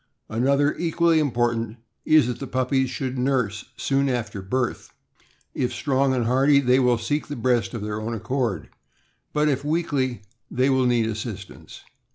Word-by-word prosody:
Another, 140 +6 +2
equally 170 -1 +2
important, 120 -5 0 0.3
is 155 -4 +5
that 125 0 -3
the 135 - -5
puppies 130 +1 0
should 130 -1 -4
nurse 125 -6 0
soon 140 0 +1
after 115 -5 -3
birth. 120 +6 -2 0.6
If 125 - -1
strong 135 -1 +1
and 120 -2 0
hardy, 135 +4 +4
they 130 -1 +3
will 125 -2 +3
seek 145 +7 -2
the 145 - -5
breast 120 -5 0
of 110 - -4
their 105 0 -3
own 115 +2 -3
accord, 115 - -2 0.6
but 150 0 +1
if 140 -1 0
weakly 145 -7 -1 0.3
they 130 +2 +1
will 130 -1 +3
need 120 -2 +2
assistance. 110 -2 -7
130 Hz, 160 wpm, -24 LUFS, 115-140 Hz, 0.6 s, is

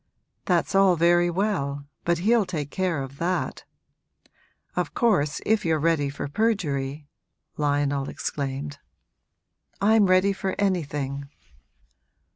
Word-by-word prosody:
'That's - - +1
all 195 -2 +5
very 175 +1 +4
well, 165 -7 -1 0.2
but 170 0 +2
he'll 220 +6 +3
take 150 -6 -4
care 180 -7 -1
of 135 +1 -10
that. 180 +2 -2 1.1
Of - - -2
course 185 - +2
if 220 0 +2
you're 160 -2 +2
ready 155 -2 +1
for 140 +1 -5
perjury 145 -7 -1 0.2
!' - - -49
Lionel 145 -2 0
exclaimed. 140 0 -4 1.0
'I'm 210 0 +4
ready 185 +2 +4
for 190 0 -3
anything.' 145 -8 -1
165 Hz, 115 wpm, -25 LUFS, 145-195 Hz, 1.1 s, all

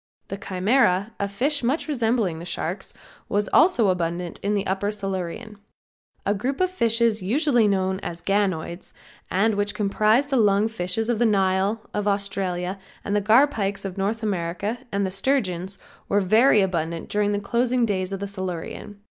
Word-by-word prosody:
The 195 - -4
Chimera, 200 +1 +1
a 200 - 0
fish 270 +9 0
much 265 +8 0
resembling 225 - 0
the - - -8
sharks, 175 +2 -4 0.4
was 205 +1 0
also 295 - +4
abundant 175 -1 -2
in 205 +1 0
the 200 -1 -1
upper 195 +2 -1
Silurian. 200 +1 -5 0.7
A 200 - +2
group 255 +7 -2
of 370 0 +1
fishes 230 - +2
usually 245 - +2
known 190 -1 0
as 170 -3 -6
ganoids 190 -4 -1 0.4
and 215 +4 +2
which 205 0 -1
comprise 215 +5 +2
the 280 -2 0
lung 205 -1 +3
fishes 220 +1 -2
of 240 -3 0
the 240 - +3
Nile, 195 +1 +1
of 210 0 -1
Australia, 195 -2 -1 0.3
the 205 0 +1
garpikes 210 -3 +2
of 190 -2 -4
North 210 +4 -2
America 200 +3 -2
and 200 0 0
the 190 - -3
sturgeons, 195 -4 -1 0.3
were 200 - +3
very 215 +4 +5
abundant 170 -3 -2
during 205 0 0
the 205 - 0
closing 240 +4 +1
days 190 -3 -2
of 195 - -3
the 200 - -4
Silurian. 190 +1 -6
200 Hz, 165 wpm, -24 LUFS, 190-225 Hz, 0.7 s, very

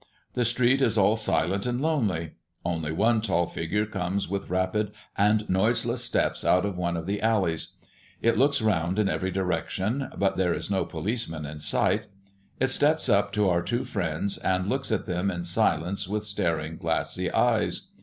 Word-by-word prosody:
The 125 - +1
street 125 +3 +2
is 115 -4 +3
all 100 +2 +4
silent 100 -1 0
and 120 0 -1
lonely; 110 - 0 0.3
only 80 -3 -2
one 110 +6 +2
tall 95 -5 +1
figure 95 +7 -2
comes 95 -1 -2
with 100 +2 -4
rapid 95 +3 0 0.2
and 105 +1 +2
noiseless 115 +5 +2
steps 115 - 0
out 90 +2 +3
of 100 -2 -3
one 85 -1 -1
of 80 - -5
the 100 +1 -2
alleys. 100 -8 0 0.5
It 115 - +2
looks 140 0 +2
round 90 -3 +1
in 105 -2 +2
every 95 0 -1
direction; 95 - -1
but 100 -1 +1
there 90 -3 +2
is - - -4
no 95 - +1
policeman 85 -2 -4
in 75 +1 -7
sight. 75 - +1 0.5
It 130 - +2
steps 155 +3 +2
up 100 0 +3
to 105 -1 +2
our 85 -1 +2
two 120 +7 -2
friends, 90 0 -1
and 95 0 0
looks 135 +5 -1
at 110 - 0
them 90 +2 -1
in 90 -2 -3
silence 85 +3 +1
with 105 +2 -2
staring 80 -5 -1
glassy - - -1
eyes. - - +1
100 Hz, 175 wpm, -26 LUFS, 90-110 Hz, 0.5 s, all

